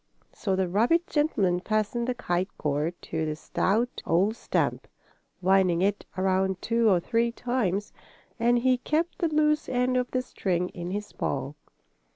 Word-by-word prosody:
So 195 -3 -1
the 190 -1 +1
rabbit 235 - +2
gentleman 210 - +1
fastened 215 +4 -1
the 250 - -1
kite 185 -5 -1
cord 150 +4 -1
to 160 -1 -3
the 155 -1 -2
stout 220 +9 -1
old 190 +7 +2
stump, - - -1 0.6
winding 185 -2 +3
it 200 +1 0
around 190 0 +1
two 230 +1 +2
or 185 -3 +4
three 230 +5 +1
times, 225 -5 -1 0.5
and 240 +1 +3
he 255 +1 +2
kept 320 +6 -1
the 340 - +2
loose 300 -1 +2
end 255 0 +1
of 250 0 0
the 255 0 -1
string 180 -6 -1
in 175 0 -6
his 205 +2 -4
paw. 135 +1 -3
205 Hz, 160 wpm, -27 LUFS, 180-245 Hz, 0.6 s, or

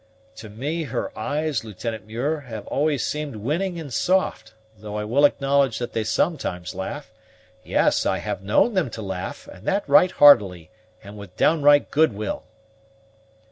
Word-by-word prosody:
"To 110 - -10
me 145 +10 -4
her 280 - -4
eyes, 150 - -2
Lieutenant 110 +1 -6
Muir, 135 +8 -2
have 110 -3 -7
always 145 -2 0
seemed 150 -4 -4
winning 170 - -2
and 145 -6 -8
soft, 185 -5 0 0.2
though 105 0 -8
I 105 - -2
will 130 +7 +3
acknowledge 140 -3 +2
that 120 - -5
they 110 - -1
sometimes 110 - -2
laugh; 95 0 -6 0.5
yes, - - +2
I - - 0
have - - -4
known 105 - +2
them 185 -9 0
to 110 - -7
laugh, 95 -2 -6
and 95 - -13
that 200 +1 0
right 185 -1 +6
heartily, 105 - +5 0.3
and 105 +1 -11
with 95 -3 -12
downright 145 -2 +4
goodwill." 110 -9 0
130 Hz, 155 wpm, -23 LUFS, 105-155 Hz, 0.5 s, right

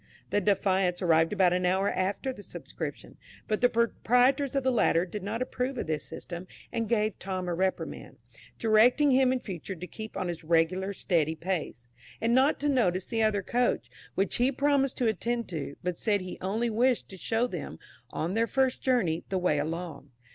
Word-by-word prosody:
The 205 - +2
"Defiance" 190 -3 +2
arrived 165 -1 +4
about 190 -4 +3
an 180 0 0
hour 190 +2 +2
after 200 +9 -1
the 205 - -11
Subscription; - - -7 0.3
but 215 - -1
the 245 - +5
proprietors 250 +4 +2
of 275 - +1
the 260 - +2
latter 180 -7 +3
did 205 +3 -6
not 220 +6 -2
approve 255 +1 -3
of - - -2
this 155 -1 -2
system, 175 +1 -8 0.3
and 230 -3 -1
gave 215 -3 +1
Tom 185 -1 -4
a 175 - -1
reprimand, 185 +2 -3 0.4
directing 235 +6 +4
him 260 0 +4
in 260 - 0
future 190 -1 -6
to 180 +1 -7
keep 220 +4 -8
on 185 - -2
his 170 -2 -5
regular 170 +4 +1
steady 165 -5 0
pace,[21 165 -8 -4 0.3
*] - - -33
and 230 +1 +2
not 265 +4 +4
to 295 - +1
notice 190 -9 +2
the 225 -2 -1
other 210 -3 +2
coach, 245 +5 0 0.2
which 195 +1 0
he 250 +3 +3
promised 275 0 +1
to 250 - 0
attend 235 +3 -1
to, 150 -5 -5
but 180 -1 -2
said 205 -3 +1
he 185 0 -7
only 220 +5 -1
wished 245 +3 +2
to 190 - -9
show 225 +5 0
them, 250 - -6 0.3
on 170 +4 -3
their 225 +2 +2
first 265 0 +1
journey, 195 -11 +1
the 190 - 0
way 175 -5 +1
along. 165 +1 -4
205 Hz, 195 wpm, -28 LUFS, 180-245 Hz, 0.4 s, the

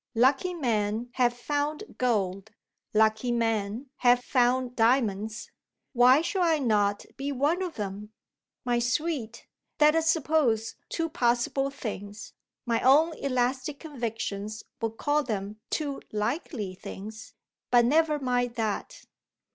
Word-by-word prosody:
Lucky 270 +9 +3
men 230 -4 -1
have 245 -2 +3
found 290 - -2 0.2
gold, 200 -5 0 0.4
lucky 220 +2 +2
men 225 +2 -1
have 245 0 +4
found 250 0 +2
diamonds. 220 -3 +1 0.4
Why 255 +4 +6
should 375 +2 -1
I 330 -3 +3
not 210 -6 +1
be 275 +2 -3
one 290 +7 +1
of 360 -3 -3
them? 205 +1 -5 0.5
My 240 -1 +2
sweet, 245 -2 -2 0.3
let 300 0 +6
us 325 0 +2
suppose 285 -9 +1 0.2
two 330 -1 -1
possible 265 -2 +1
things; 210 -5 -7 0.3
my 230 -2 +1
own 310 +5 +5
elastic 260 +2 -1
convictions 220 -7 -4 0.2
would 225 0 -2
call 295 0 +1
them 210 -4 -4
two 285 -3 -2
likely 215 - -2
things, 215 +5 -9 0.3
but 240 -1 +5
never 305 +3 +3
mind 245 -3 -1
that. 220 -3 -3
245 Hz, 125 wpm, -27 LUFS, 220-285 Hz, 0.5 s, Why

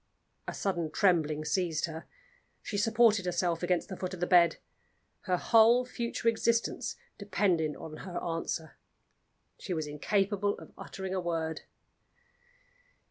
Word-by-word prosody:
A - - -3
sudden 175 -5 -1
trembling 155 -6 +2
seized 160 0 0
her. 160 -1 -8 0.6
She 210 - -5
supported 220 -1 +3
herself 175 -1 0
against 180 0 0
the 190 - -6
foot 185 0 -4
of - - -12
the 175 - +1
bed. 175 -2 +5 0.7
Her 185 -2 +1
whole 230 +5 +5
future 235 -1 -3
existence 230 0 +1 0.2
depended 185 -6 +1
on 155 -1 -9
her 180 0 -7
answer. 165 -2 -4 0.8
She 180 - -4
was 155 -1 -2
incapable 200 +7 0
of - - -12
uttering 190 -1 -6
a 185 - -1
word. 165 -2 -2
180 Hz, 135 wpm, -30 LUFS, 165-205 Hz, 0.8 s, bed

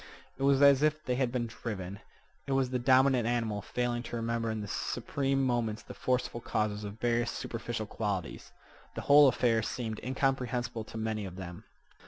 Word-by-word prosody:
It - - -8
was 140 0 +4
as 140 -1 +7
if 155 0 +2
they 125 - 0
had 125 -1 0
been 120 -1 -1
driven. 100 -4 -6 0.5
It 135 - 0
was 135 -1 +1
the 125 - 0
dominant 130 -1 +4
animal 115 -4 0
failing 120 +3 -2
to 120 - -6
remember 115 0 -1
in 110 -1 -2
the 105 - -5
supreme 135 +6 -1
moments 120 -3 -1
the - - -9
forceful 125 -2 -1
causes 105 -1 -1
of 105 +1 -7
various 120 0 +1
superficial 115 -1 -4
qualities. 100 -6 -4 0.4
The - - -3
whole 145 0 +7
affair 120 -3 +3
seemed 110 -1 -4
incomprehensible 125 -3 -1
to 110 - -9
many 110 -1 -2
of 90 -2 -7
them. 90 -2 -8
120 Hz, 180 wpm, -31 LUFS, 110-130 Hz, 0.5 s, as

